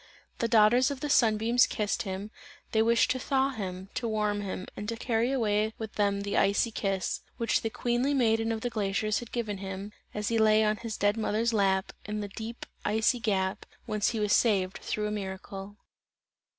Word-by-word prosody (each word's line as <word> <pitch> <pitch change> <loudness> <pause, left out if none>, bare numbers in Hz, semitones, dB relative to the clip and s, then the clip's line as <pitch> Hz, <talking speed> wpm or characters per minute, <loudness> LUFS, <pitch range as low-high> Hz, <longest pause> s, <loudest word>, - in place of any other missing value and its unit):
The 230 - +1
daughters 230 +3 +5
of 280 -2 -4
the 295 -1 -1
sun 220 -6 +4
beams 235 +3 +4
kissed 210 -2 -1
him, 195 +2 -5 0.4
they 220 - +3
wished 230 +1 +3
to 255 - -1
thaw 270 +1 +1
him, 190 -5 -6
to 235 - -2
warm 210 -2 0
him 190 -1 -4
and 210 - -5
to 230 - -2
carry 230 +1 0
away 215 -4 +1
with 220 -1 -6
them 200 -1 +1
the 200 0 -2
icy 200 +4 +2
kiss, 195 -4 -1 0.2
which 230 -3 +1
the 225 - -1
queenly 245 +5 0
maiden 225 -3 +2
of 220 -1 -2
the 245 - -2
glaciers 210 -1 0
had 240 - -10
given 215 -5 -3
him, 195 +1 -6 0.2
as 210 0 -2
he 230 -1 +1
lay 215 0 +5
on 215 0 +1
his 230 -2 -5
dead 205 +2 +2
mother's 225 +1 0
lap, 195 -2 +1
in 210 0 -4
the 205 -1 -4
deep 225 +3 -7 0.2
icy 220 +3 +2
gap, 195 -4 0 0.2
whence 210 -1 0
he 230 - -2
was 210 -1 +2
saved 195 -5 +2
through 215 -2 -2
a 210 - -2
miracle. 195 0 -6
215 Hz, 200 wpm, -29 LUFS, 200-230 Hz, 0.4 s, daughters